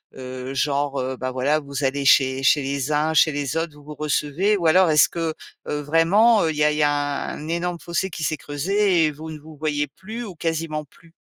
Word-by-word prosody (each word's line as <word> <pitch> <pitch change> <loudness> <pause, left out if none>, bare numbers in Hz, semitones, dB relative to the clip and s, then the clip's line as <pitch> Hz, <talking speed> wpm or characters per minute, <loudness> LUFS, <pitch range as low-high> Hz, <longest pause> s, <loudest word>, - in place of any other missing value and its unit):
heu, 130 0 -7
genre, 140 0 0
heu, 130 0 -3
bah, 130 0 -3
voilà 140 +4 +1
vous 140 -1 -6
allez 140 +1 0
chez 130 0 +4
chez 145 +2 +4
les 140 +1 -2
uns, 155 +2 +1
chez 155 0 +4
les 145 +1 -2
autres, 165 -2 -2
vous 145 - -16
vous 150 +1 -9
recevez? 150 +7 0
Ou 175 - -3
alors 180 +2 +5
est-ce 150 -2 +5
que, 165 -2 -2 0.3
heu, 150 0 -2
vraiment, 185 +9 +4
heu, 160 - +1
il 155 - -6
y 150 - +1
a 150 - +4
il 150 - -3
y 150 - +3
a 145 -1 0
un 150 - -7
énorme 170 0 -2
fossé 175 +2 -2
qui 160 -2 -6
s'est 155 -1 -1
creusé 175 +4 +1
et 155 - -2
vous 155 +2 -9
ne 155 - -8
vous 155 +1 -14
voyez 145 -1 -1
plus 220 - -8
ou 195 -6 -8
quasiment 160 -2 -3
plus? 165 +4 -23
150 Hz, 240 wpm, -22 LUFS, 145-165 Hz, 0.3 s, alors